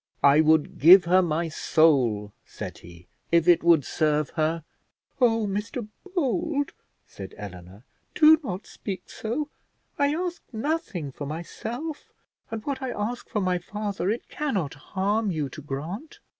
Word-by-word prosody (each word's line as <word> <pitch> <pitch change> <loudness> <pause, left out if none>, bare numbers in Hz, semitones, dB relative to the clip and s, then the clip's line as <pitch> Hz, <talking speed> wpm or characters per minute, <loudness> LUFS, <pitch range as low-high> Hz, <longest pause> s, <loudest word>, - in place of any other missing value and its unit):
"I 140 +2 +7
would 155 -1 +2
give 175 +3 +9
her 185 +2 +5
my 165 -1 0
soul," 130 -11 +2
said - - -8
he, 85 0 -14 0.3
"if 170 0 +4
it 175 -2 +6
would 165 -5 +5
serve 150 -2 0
her." 160 0 0 0.6
"Oh, 225 -3 +3
Mr 210 +3 -3 0.3
Bold," 315 -2 0 0.3
said 95 -1 -10
Eleanor, 95 +1 -10 0.3
"do 315 -2 +7
not 190 -5 -5
speak 195 -3 -7
so; 270 +7 -3 0.5
I 285 +1 +3
ask 350 +1 -3
nothing 220 - -2
for 145 +2 -7
myself; 230 - -6 0.4
and 225 -1 -5
what 275 -2 -3
I 260 - -2
ask 240 +2 -4
for 210 - -1
my 180 -1 +1
father, 200 0 -3
it 230 +4 -2
cannot 200 - -2
harm 200 +8 -1
you 155 -6 -2
to 150 - -9
grant." 155 - -6
185 Hz, 145 wpm, -26 LUFS, 155-240 Hz, 0.6 s, give